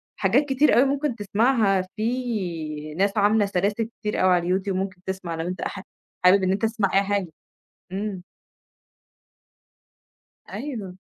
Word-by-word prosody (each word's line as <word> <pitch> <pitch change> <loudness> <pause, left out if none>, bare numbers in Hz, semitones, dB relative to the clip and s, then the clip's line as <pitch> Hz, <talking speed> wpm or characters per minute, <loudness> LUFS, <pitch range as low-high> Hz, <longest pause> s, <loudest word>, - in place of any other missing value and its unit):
حاجات 295 - +2
كتير 280 +2 +3
أوي 250 - +7
ممكن 280 -1 0
تسمعها، 205 -2 +2
في 185 -11 -3
ناس 200 +5 0
عاملة 205 +1 +4
سلاسل 200 +3 0 0.2
كتير 210 -2 -2
أوي 185 - +5
على 175 0 +1
الYouTube 195 0 -3
ممكن 190 -1 -3
تسمع 190 -3 -4
لو 165 +1 -3
أنت 180 -1 -4
حا 195 - -4 0.4
حابب 190 +2 +6
إن 185 - +2
أنت 195 - -1
تسمع 220 -3 0
أي 195 +1 +4
حاجة، 200 -2 -1 0.6
إمم. 195 -1 -3 2.3
أيوه. 215 -7 -6
200 Hz, 140 wpm, -24 LUFS, 185-225 Hz, 2.3 s, أوي